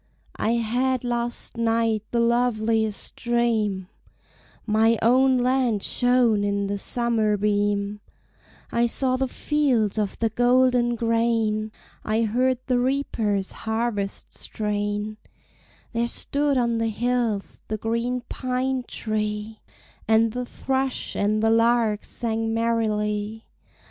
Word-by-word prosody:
"I 225 - +1
had 245 +3 0
last 240 -1 -3
night 230 -1 +1
the 235 - 0
loveliest 225 -3 +1
dream: 225 -6 0 0.8
My 225 +1 +3
own 260 +3 +4
land 250 -4 +1
shone 245 -4 +3
in 200 0 0
the 200 0 -2
summer 225 -2 +1
beam, 205 0 0 0.7
I 235 0 +2
saw 255 +2 0
the 265 +1 0
fields 250 -8 +1
of 205 -2 -2
the 225 - +1
golden 245 0 +3
grain, 225 -2 0 0.3
I 220 +1 +1
heard 250 +4 +1
the 250 -2 +1
reaper's 230 -7 0
harvest 220 -3 -3
strain; 210 0 -3 0.8
There 235 0 0
stood 285 +3 0
on 235 -2 +1
the 225 - +1
hills 235 -2 -1
the 215 - -2
green 235 +3 -1
pine 255 0 -2
tree, 215 0 -3 0.5
And 220 +1 +4
the 250 +2 -3
thrush 265 0 -2
and 215 +1 +1
the 225 - +4
lark 230 -2 +3
sang 225 -1 -2
merrily. 220 -1 -1
230 Hz, 115 wpm, -24 LUFS, 215-245 Hz, 0.8 s, own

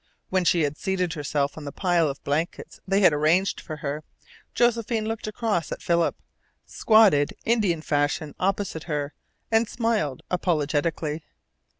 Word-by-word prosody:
When 185 -1 +1
she 170 +1 +3
had 145 +1 -2
seated 185 -3 -1
herself 145 -1 -2
on 150 - -9
the 140 - -5
pile 175 -1 +2
of 140 - -7
blankets 155 +4 -3
they 195 +1 +2
had 180 - +6
arranged 160 +6 +2
for 155 - -6
her, 145 +2 -3 0.5
Josephine 230 -2 +1
looked 225 0 -4
across 215 -6 -1
at - - -5
Philip, 170 -1 +2 0.5
squatted 205 -10 +4
Indian 205 -9 +1
fashion 145 0 0
opposite 195 -4 -1
her, 150 -3 -3 0.4
and 225 0 +3
smiled 220 - -1
apologetically. 155 -2 0
170 Hz, 140 wpm, -25 LUFS, 150-205 Hz, 0.5 s, had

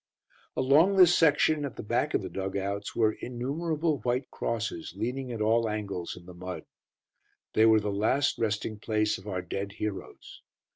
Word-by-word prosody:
Along 150 +9 +4
this 180 -2 +7
section, 150 -1 +3
at 140 - -4
the - - -7
back 105 - 0
of - - 0
the - - -5
dug 95 0 -3
outs, 100 +1 -3
were 110 -2 +3
innumerable 150 +5 -1
white 125 +2 -1
crosses, 110 -7 -3
leaning 125 +4 -3
at 115 -2 -4
all 115 +1 +2
angles, 100 -5 -4
in 90 - -13
the 90 - -11
mud. 90 -2 -7 0.9
They 110 +1 +5
were 110 -1 +6
the 105 0 -2
last 110 +8 +1
resting 110 -1 -1
place 105 -2 0
of 95 - -14
our 95 -3 -3
dead 100 +3 -4
heroes. 105 -2 -6
110 Hz, 175 wpm, -28 LUFS, 100-135 Hz, 0.9 s, this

